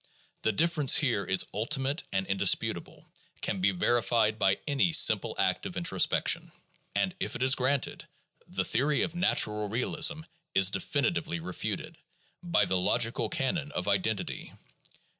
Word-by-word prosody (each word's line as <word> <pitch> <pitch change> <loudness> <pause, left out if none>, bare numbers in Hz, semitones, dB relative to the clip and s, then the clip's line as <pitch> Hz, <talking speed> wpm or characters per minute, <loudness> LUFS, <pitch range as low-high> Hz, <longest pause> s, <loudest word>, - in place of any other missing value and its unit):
The 110 - +1
difference 155 +3 +3
here 125 -10 0
is 95 - +4
ultimate 135 - -1
and 95 -1 -1
indisputable, 95 0 -1 0.4
can 95 - -2
be 95 - +3
verified 110 +2 0
by 95 -1 +2
any 145 +4 +1
simple 110 -9 +5
act - - 0
of - - -8
introspection. - - +2 0.4
And 185 - 0
if - - -3
it 125 - -2
is 130 0 +5
granted, 130 +1 -1 0.4
the - - -3
theory 140 +5 0
of - - -3
natural 105 - +1
realism 125 +7 0 0.3
is 95 0 +5
definitely 85 - -2
refuted, 90 +2 -5 0.4
by 175 -2 +1
the 95 - 0
logical 115 +3 0
canon 145 +2 -2
of 90 - -3
identity. 100 +1 -2
115 Hz, 140 wpm, -28 LUFS, 100-145 Hz, 0.4 s, simple